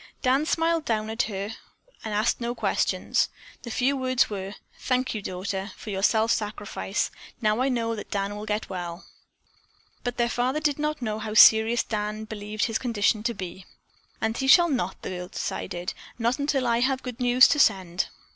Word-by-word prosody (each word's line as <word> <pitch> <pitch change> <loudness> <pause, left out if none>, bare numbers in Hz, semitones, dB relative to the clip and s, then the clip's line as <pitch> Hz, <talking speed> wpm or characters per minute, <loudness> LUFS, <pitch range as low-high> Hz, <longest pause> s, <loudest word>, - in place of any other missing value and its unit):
Dan 270 +4 +2
smiled 330 0 +1
down 220 -4 -1
at 225 - 0
her 200 +1 -4 0.5
and 220 - -4
asked 215 +4 +1
no 235 +1 -2
questions. - - +1 0.3
The 235 - -8
few 260 +4 +1
words 255 -3 +1
were: 195 0 -5 0.2
"Thank 255 0 0
you, 215 - -4
daughter, 190 +1 -4
for 215 - -7
your 190 -1 -2
self 220 +2 +3
sacrifice. 205 -2 -2 0.3
Now 215 +1 +1
I 265 - +2
know 230 -3 0
that 210 - -8
Dan 200 0 -2
will 210 +1 -7
get 210 +1 -1
well." 175 -1 -6 1.0
But 245 0 -3
their 240 -1 +2
father 250 +4 0
did 295 -2 0
not 300 -3 -2
know 215 -1 -2
how 215 0 -5
serious 220 +2 +7
Dan 215 0 -3
believed 210 0 -3
his 225 -2 -1
condition 220 -3 +1
to 235 +1 -2
be. 185 -1 -7 0.5
"And 220 0 -1
he 265 +2 -2
shall 345 +5 +7
not," 235 - -1
the - - -4
girl 180 -1 -5
decided, 175 0 -4 0.2
"not 235 +3 0
until 280 -2 0
I 235 -1 +2
have 260 +1 +1
good 250 -1 -6
news 245 +1 +6
to 295 - +2
send." 190 -8 +2
220 Hz, 185 wpm, -26 LUFS, 205-255 Hz, 1.0 s, serious